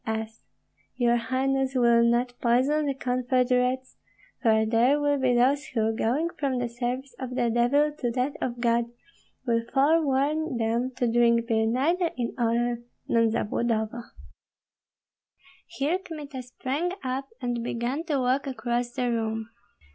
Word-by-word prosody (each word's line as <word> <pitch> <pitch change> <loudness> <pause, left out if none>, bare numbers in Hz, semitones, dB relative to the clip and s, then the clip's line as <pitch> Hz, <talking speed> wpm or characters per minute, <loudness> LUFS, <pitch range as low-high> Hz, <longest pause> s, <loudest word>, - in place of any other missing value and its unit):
P. 220 - -2
S. 220 0 -5 0.5
Your 240 -1 +2
highness 265 +3 0
will 235 -2 +4
not 240 +1 +2
poison 265 +6 +2
the 275 - -1
confederates, 255 0 0 0.4
for 220 -2 +3
there 240 +6 +3
will 290 -1 +1
be 255 -2 +2
those 270 +4 +3
who, 225 -2 0
going 275 +10 0
from 275 -3 0
the 245 0 -1
service 245 +3 -4
of 255 -2 -5
the 240 -2 +1
devil 265 +6 +3
to 245 - 0
that 250 +4 -1
of 240 -1 -3
God, 235 0 +2 0.6
will 230 -2 +2
forewarn 290 0 +2
them 230 +2 0
to 255 - +1
drink 235 0 +3
beer 220 -1 +1
neither 330 +9 +1
in 240 -2 -2
Orel 235 +1 +1 0.3
nor 230 -1 +3
Zabludovo. 225 +1 -1 1.7
Here 305 +7 -1
Kmita 300 -7 -7
sprang 270 +7 -3
up 265 +1 -3
and 245 -2 -2
began 240 +6 -2
to 300 -5 0
walk 260 +3 +1
across 240 -1 -2
the 250 -2 -1
room. 225 -1 -2
250 Hz, 145 wpm, -26 LUFS, 235-270 Hz, 1.7 s, will